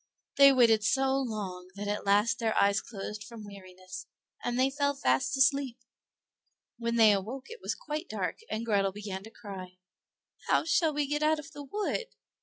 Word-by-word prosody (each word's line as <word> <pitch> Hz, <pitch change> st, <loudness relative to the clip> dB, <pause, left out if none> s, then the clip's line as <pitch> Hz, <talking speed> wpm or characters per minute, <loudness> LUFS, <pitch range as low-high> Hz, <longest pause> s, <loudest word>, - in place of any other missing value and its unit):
They 275 Hz, 0 st, +9 dB
waited 230 Hz, -5 st, +5 dB
so 265 Hz, +4 st, +2 dB
long 200 Hz, -7 st, -4 dB
that 205 Hz, +1 st, -5 dB
at 205 Hz, 0 st, -3 dB
last 210 Hz, +4 st, +3 dB
their 225 Hz, -2 st, +1 dB
eyes 200 Hz, +1 st, +3 dB
closed 210 Hz, 0 st, -7 dB
from 220 Hz, -1 st, -10 dB
weariness, 185 Hz, -2 st, -10 dB, 0.4 s
and 240 Hz, 0 st, -1 dB
they 260 Hz, +1 st, +3 dB
fell 285 Hz, 0 st, 0 dB
fast 130 Hz, -, +1 dB
asleep. 270 Hz, -2 st, +3 dB, 1.0 s
When 235 Hz, 0 st, -1 dB
they 220 Hz, -2 st, +7 dB
awoke 230 Hz, -, -3 dB
it 470 Hz, -, -9 dB
was -, -, -2 dB
quite 305 Hz, +3 st, -5 dB
dark, -, -, -3 dB
and 225 Hz, +2 st, -3 dB
Grethel 200 Hz, -3 st, +2 dB
began 200 Hz, -2 st, -6 dB
to -, -, -10 dB
cry; 190 Hz, -5 st, -9 dB, 0.7 s
"How -, -, +3 dB
shall 330 Hz, -1 st, +3 dB
we 295 Hz, 0 st, 0 dB
get 295 Hz, +2 st, -1 dB
out 310 Hz, +1 st, +3 dB
of 300 Hz, -2 st, -9 dB
the 290 Hz, -, -9 dB
wood?" 420 Hz, -, -2 dB
230 Hz, 180 wpm, -30 LUFS, 200-275 Hz, 1.0 s, They